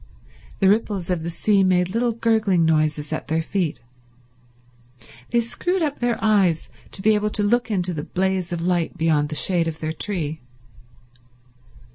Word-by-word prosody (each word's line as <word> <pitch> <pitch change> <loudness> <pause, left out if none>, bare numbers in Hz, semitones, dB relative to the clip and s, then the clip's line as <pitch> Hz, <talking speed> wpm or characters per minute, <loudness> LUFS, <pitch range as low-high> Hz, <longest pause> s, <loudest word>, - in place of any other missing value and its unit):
The 195 - +3
ripples 200 -3 +1
of 175 -3 -1
the 165 - -4
sea 195 +3 +2
made 180 -1 +2
little 235 +1 +1
gurgling 220 -6 +2
noises 155 -2 +1
at - - -4
their 160 +2 0
feet. 175 -3 -2 1.5
They 235 - +2
screwed 355 +10 -2
up 290 -2 -2
their 240 -2 0
eyes 195 -7 +2 0.2
to 190 - -7
be 220 - +5
able 210 0 +1
to 210 0 -2
look 240 +4 +1
into 180 -4 -1
the 150 -2 -4
blaze 190 -1 -1
of 170 -1 -3
light 175 -2 0
beyond 155 -2 +1
the 155 - -5
shade 170 0 +2
of 160 -1 -4
their 155 0 -3
tree. 160 -4 -2
185 Hz, 165 wpm, -22 LUFS, 165-215 Hz, 1.5 s, be